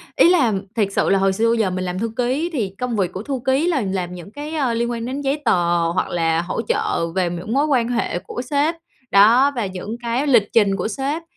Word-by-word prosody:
ý - - +6
là, 280 -12 +3 0.2
thiệt 210 -4 +2
sự - - +1
là 195 - +3
hồi 195 0 +2
xưa 225 +4 +1
bây 235 - +2
giờ 215 -4 +1
mình 185 0 -3
làm 180 +1 -3
thư 225 0 -2
ký 260 +8 0
thì 225 -10 -1
công 250 -2 -2
việc 190 -3 0
của 190 - -5
thư 270 0 -3
ký 270 +6 +2
là 305 -8 +1
làm 190 -3 -3
những 180 +2 -10
cái, 295 +4 -7
ờ, 260 -6 0
liên 235 +1 -1
quan 230 -1 -4
đến 270 +3 -4
giấy 280 +2 -1
tờ 175 -4 +2
hoặc 175 - -1
là 165 -1 +1
hỗ 175 +6 -3
trợ 170 -5 -1
về 185 -2 +1
những 175 +6 -5
mối 280 +3 +2
quan 255 -6 +1
hệ 235 -7 -1
của 245 - -6
sếp, 290 +5 0 0.4
đó, 230 +8 +6
và 235 - -1
những 190 +4 -6
cái 240 +4 -1
lịch 235 -7 +4
trình 205 -4 +4
của 190 +2 -2
sếp, 275 +8 -3
230 Hz, 255 wpm, -20 LUFS, 190-270 Hz, 0.4 s, ý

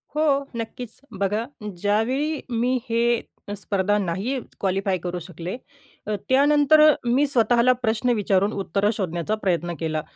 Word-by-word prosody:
हो, 305 - +2 0.3
नक्कीच. 230 0 -6 0.2
बघा 205 +3 0 0.4
ज्यावेळी 255 +9 0
मी 245 +2 0
हे 235 0 +2 0.4
स्पर्धा 200 0 0
नाही 200 +8 -2 0.2
क्वालिफाय 195 0 0
करू 180 0 -3
शकले, 175 +3 -7 0.5
अ, 215 - 0
त्यानंतर 290 +3 +5 0.2
मी 255 +5 +3
स्वतःला 240 -2 +3
प्रश्न 230 +2 0
विचारून 200 -1 +1
उत्तरं 200 +1 0
शोधण्याचा 180 +1 -2
प्रयत्न 175 -2 0
केला. 155 -1 -2
215 Hz, 125 wpm, -23 LUFS, 190-245 Hz, 0.5 s, त्यानंतर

